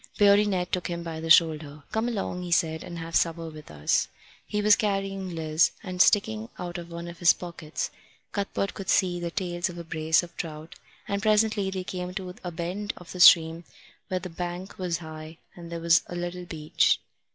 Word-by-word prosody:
Beardy 205 0 +6
Ned 180 -3 -1
took 180 - -1
him 170 -1 -4
by 165 -1 -5
the 165 0 -5
shoulder. 155 -3 +4
"Come 220 +2 0
along," 195 -6 -3
he 180 - -5
said, 160 -2 +1
"and 170 - -7
have 165 0 -5
supper 165 -1 +1
with 155 -1 -12
us." 75 -1 +1 0.4
He 210 - -1
was 210 0 +6
carrying 195 -3 -2
Liz, 160 0 +3
and 185 -3 -1
sticking 110 - +3
out 175 0 -5
of 170 0 -9
one 170 0 -6
of 170 -1 -9
his 170 -3 +6
pockets 170 -3 -5 0.4
Cuthbert 200 -1 -2
could 195 - -7
see 180 -2 +2
the 170 0 -3
tails 175 -1 -2
of 175 - -9
a 170 - -6
brace 160 +1 +2
of 170 -1 -11
trout; 155 -1 -6 0.3
and 200 0 -1
presently 215 -2 +2
they 190 -1 -3
came 180 0 -5
to 185 -3 -5
a 180 - -3
bend 180 +5 -4
of 180 - -12
the 180 - -7
stream, 165 -1 +7 0.4
where 185 - -1
the 180 - -6
bank 175 +3 -6
was 175 -2 -1
high 160 -1 -9 0.2
and 170 -1 -10
there 170 - -4
was 170 +1 +5
a 175 - -7
little 175 +1 -4
beach. 155 -3 +1
175 Hz, 205 wpm, -27 LUFS, 165-185 Hz, 0.4 s, stream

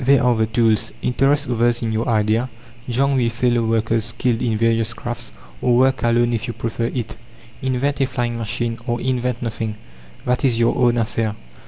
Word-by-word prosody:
There 135 0 +4
are 125 -1 +4
the 110 0 +1
tools; 115 -1 +2
interest 140 +3 +2
others 120 0 +1
in 115 - -1
your 110 +2 -1
idea; 110 +2 +1 0.4
join 135 +3 +2
with 120 -2 +1
fellow 120 0 +2
workers 115 0 +1
skilled 115 0 0
in 115 -3 0
various 115 0 +1
crafts, 120 +1 -6 0.3
or 120 -1 +3
work 130 +1 +3
alone 120 0 +2
if 115 - -2
you 120 - -5
prefer 115 0 -2
it. 115 -2 -4 0.4
Invent 135 +2 0
a 135 - +3
flying 120 -2 -2
machine, 115 +1 -3
or 120 -1 0
invent 125 -1 -1
nothing 110 -2 -3 0.5
that 125 0 0
is 125 -4 +3
your 115 0 +2
own 120 -2 +3
affair. 110 -1 -1
120 Hz, 185 wpm, -20 LUFS, 115-125 Hz, 0.5 s, There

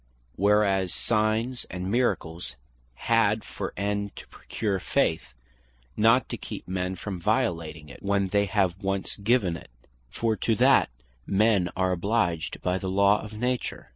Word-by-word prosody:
Whereas 100 -2 +2
Signs, 110 +3 +1
and 90 +2 -4
Miracles 85 - -1 0.4
had 110 - +2
for - - -5
End 100 +1 -2
to - - -10
procure 100 -4 -3
Faith, 60 -7 0 0.6
not 115 +3 +4
to - - -4
keep - - -8
men 90 0 -2
from 95 -1 -6
violating 85 -9 -1
it, 70 - -12
when 100 -1 0
they 100 +1 +2
have 95 -2 0
once 95 -1 -1
given 100 -4 +1
it; - - -11 0.4
for 110 - 0
to 115 - +1
that 130 +4 +4 0.4
men 100 -3 +3
are 95 0 +1
obliged 90 -3 -1
by 90 +1 0
the 95 - -3
law 100 +2 +4
of 110 0 -9
Nature. 125 +3 -3
100 Hz, 145 wpm, -26 LUFS, 90-110 Hz, 0.6 s, not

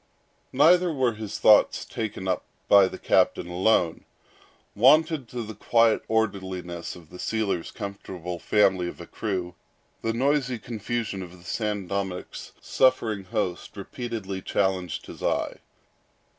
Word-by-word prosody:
Neither 180 +1 +5
were 130 -5 +1
his 110 -1 -6
thoughts 105 -1 +5
taken 105 -4 -5
up 95 - 0 0.2
by 100 -2 +7
the - - -7
captain - - +2
alone. 90 -2 +1 0.7
Wonted 150 +4 +4
to 120 0 -5
the 110 0 -7
quiet 115 +2 +3
orderliness 95 -6 -2
of 85 -3 -15
the 90 - -11
sealer's 105 -6 -1
comfortable 90 -3 -6
family 95 -3 +2
of - - -8
a - - -8
crew, 95 -5 -4 0.5
the 115 - 0
noisy 130 +1 +1
confusion 115 -2 -4
of 90 0 -9
the 85 - -18
San 105 +1 -2
Dominick's 95 -1 -4
suffering 110 -6 +1
host 100 -3 -3
repeatedly 100 -2 -5
challenged 95 -3 -1
his - - -11
eye. - - -1
105 Hz, 130 wpm, -26 LUFS, 95-115 Hz, 0.7 s, by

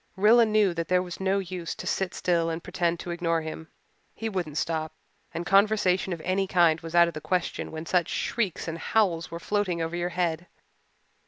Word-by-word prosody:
Rilla 225 +4 +5
knew 210 -4 +3
that 170 -1 -3
there 180 0 +2
was 175 -1 -8
no 190 +1 +1
use 180 -3 -4
to - - -8
sit 190 -1 -1
still 170 -2 +1
and 165 +1 -4
pretend 175 -2 -1
to 175 - -5
ignore 165 -1 0
him. 160 0 -7 0.5
He 225 - -3
wouldn't 175 -7 -3
stop; 160 -1 -2 0.4
and 170 - -4
conversation 195 -1 +3
of 170 -2 -4
any 190 +3 0
kind 170 -4 +3
was 165 +1 -7
out 170 0 +7
of 170 - -4
the 155 - -6
question 180 +1 -2
when 160 +1 -6
such 175 -1 +1
shrieks 210 -9 -2
and 165 0 -4
howls 175 -5 +1
were 170 - -6
floating 195 -2 -1
over 165 +1 -2
your 175 0 -1
head. 175 -1 -2
175 Hz, 200 wpm, -27 LUFS, 165-190 Hz, 0.5 s, out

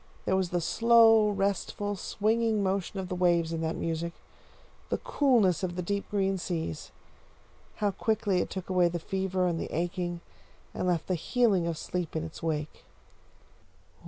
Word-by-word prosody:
There 190 - +2
was 190 -2 0
the 175 0 -1
slow, 225 +2 +5
restful, 200 0 -1
swinging 220 +2 0
motion 195 +1 -1
of 190 - -4
the 185 - -4
waves 170 -2 +2
in 165 - -2
that 160 0 -1
music; 165 +1 -3 0.8
the - - 0
coolness 235 - +2
of 180 -2 -2
the 180 - -3
deep 200 +3 -2
green 195 -2 0
seas. 160 - -4 0.8
How 205 -1 0
quickly 200 -2 0
it - - -3
took 190 -2 -6
away 180 -2 +3
the 175 - -3
fever 190 +1 -1
and 170 -2 0
the - - -5
aching, 175 +1 -2 0.5
and - - -2
left 175 -3 +1
the 185 - -1
healing 195 0 +2
of 165 -2 -2
sleep 175 +1 -4
in 160 - -1
its 160 -1 -8
wake! 155 -2 -3
185 Hz, 165 wpm, -29 LUFS, 170-205 Hz, 0.8 s, slow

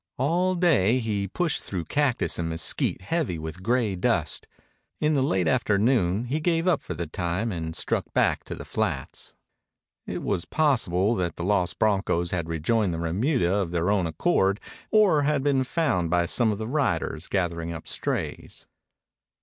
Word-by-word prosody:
All 175 +8 +1
day 135 - +3
he 105 -5 -1
pushed 165 - -1
through 90 -4 -4
cactus 145 -10 0
and 85 -1 -1
mesquite 80 +2 0
heavy 140 - -1
with 80 +3 -7
gray 115 -1 +1
dust. 90 - +1 0.5
In 155 +1 +2
the 140 - +2
late 95 -9 +1
afternoon 110 -4 +2
he 140 +6 -1
gave 165 +2 +1
up 175 -5 +3
for - - -6
the 85 - -3
time 90 +7 -2
and 80 -3 -4
struck - - -2
back - - +1
to - - -6
the - - -9
flats. - - -3 0.7
It - - -4
was 95 -4 -1
possible 115 - +2
that 85 -3 -2
the 85 - -5
lost 95 -2 +1
broncos 95 -5 +1
had 85 -3 -2
rejoined 90 +4 0
the - - -4
remuda 95 - +1
of 100 -4 0
their 85 +2 0
own 95 -5 +1
accord 100 - +1 0.3
or 205 -9 +4
had 145 -1 +1
been 140 -2 +2
found 125 - 0
by 85 0 +2
some 110 +5 +2
of 105 - -3
the 110 +1 -4
riders 100 - -1
gathering 85 -3 -1
up 80 - -8
strays. - - -4
100 Hz, 170 wpm, -26 LUFS, 85-135 Hz, 0.7 s, or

